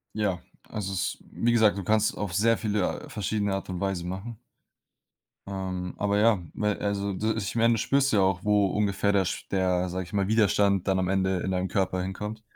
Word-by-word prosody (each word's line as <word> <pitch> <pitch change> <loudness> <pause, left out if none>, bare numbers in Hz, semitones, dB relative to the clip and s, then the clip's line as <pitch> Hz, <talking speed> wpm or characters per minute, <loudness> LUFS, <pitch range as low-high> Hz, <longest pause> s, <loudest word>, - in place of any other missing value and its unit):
Ja, 100 -5 -1 0.3
also, 100 -2 -4
s 90 - -1
wie 120 +1 +1
gesagt, 110 -4 +4
du 100 - -4
kannst 110 +2 +2
auf 100 -5 -3
sehr 115 +4 +3
viele 105 -3 -1
verschiedene 105 0 -1
Art 95 - -4
und 90 -1 -4
Weisen 95 -3 -2
machen. 100 +5 -6 1.1
Ähm, 95 -2 -4
aber 100 0 +1
ja, 110 -3 +4
me 105 -1 0
also, 100 -1 -1
d 110 +4 0
ich 105 0 -3
meine 115 0 +4
das 115 - -1
spürst 140 +3 +2
du - - +3
ja - - +4
auch, 95 -1 +1
wo 105 -1 +3
ungefähr 100 +1 0
der 100 -1 +3
sch 90 - -4
der 90 -1 +1
sage 95 +1 -3
ich 90 - -14
mal, 100 -2 0
Widerstand 100 -3 +3
dann 95 -1 +2
am 90 - 0
Ende 95 -1 +1
in 95 - -2
deinem 90 0 0
Körper 95 -1 0
hinkommt. 105 +4 -5
100 Hz, 210 wpm, -27 LUFS, 95-105 Hz, 1.1 s, gesagt